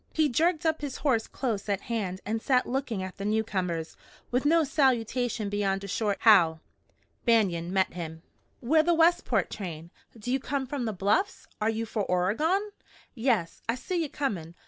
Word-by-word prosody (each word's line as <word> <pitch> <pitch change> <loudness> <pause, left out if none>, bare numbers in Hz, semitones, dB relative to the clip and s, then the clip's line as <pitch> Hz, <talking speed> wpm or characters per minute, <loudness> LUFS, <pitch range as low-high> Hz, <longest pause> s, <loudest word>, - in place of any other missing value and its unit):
He 310 -2 +3
jerked 320 +5 +1
up 315 -1 +1
his 285 -3 -4
horse 230 -6 +2
close 215 -6 -3
at 200 -1 0
hand 195 -6 -3
and 220 +2 -2
sat 255 0 +2
looking 245 -6 -2
at 185 0 -7
the 195 - -5
newcomers, 185 -6 -1 0.4
with 250 +3 0
no 330 +1 +5
salutation 245 -5 +1
beyond 200 -1 -1
a - - -5
short 205 +1 -1
"How!" 175 -8 +6 0.6
Banion 185 -7 +2
met 190 0 +1
him. 160 -2 -7 0.4
"We're 310 +6 +4
the 340 +2 +2
Westport 335 +2 +3
train. 170 -4 -6 0.3
Do 225 +3 -4
you 265 - +2
come 270 +1 -2
from 260 -1 -3
the 220 - -1
Bluffs? 205 - 0 0.2
Are 215 - +2
you 225 0 -1
for 220 -1 -2
Oregon?" 300 - +1 0.4
"Yes. 225 -9 0
I 230 - +2
seen 345 +7 -2
ye 315 - -2
comin'. 180 - -3
225 Hz, 175 wpm, -28 LUFS, 195-275 Hz, 0.6 s, How